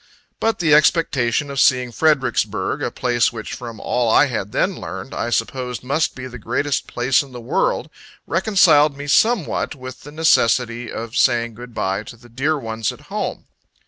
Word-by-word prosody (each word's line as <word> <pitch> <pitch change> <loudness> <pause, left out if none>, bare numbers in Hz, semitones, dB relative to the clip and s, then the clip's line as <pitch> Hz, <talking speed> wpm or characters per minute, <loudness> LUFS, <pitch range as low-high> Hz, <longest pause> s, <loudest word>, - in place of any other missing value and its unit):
But 225 0 +1
the 160 -4 +2
expectation 145 -4 +2
of 140 - -3
seeing 125 -2 +3
Fredericksburg, 135 -3 0
a - - -1
place 120 -2 +1
which, 110 -2 -7
from 115 -3 -8
all 120 -2 0
I 145 - +5
had 110 -7 -4
then - - 0
learned, - - -7
I 120 - -2
supposed 125 +1 -2
must 140 +5 0
be 130 - -7
the 125 -1 -9
greatest 130 +6 -1
place 125 +2 +2
in 135 -3 -11
the 125 - -7
world, 115 - 0 0.4
reconciled 155 -5 +4
me 145 - -6
somewhat 190 +1 +1
with 130 -1 -9
the 145 - -11
necessity 125 -6 +2
of 115 0 -6
saying 120 -1 +2
Good 120 +1 -11
bye 95 +1 -1
to 120 - -11
the 120 +1 -18
dear 140 +6 0
ones 115 -4 -3
at - - -13
home. - - -3
125 Hz, 175 wpm, -20 LUFS, 120-145 Hz, 0.4 s, I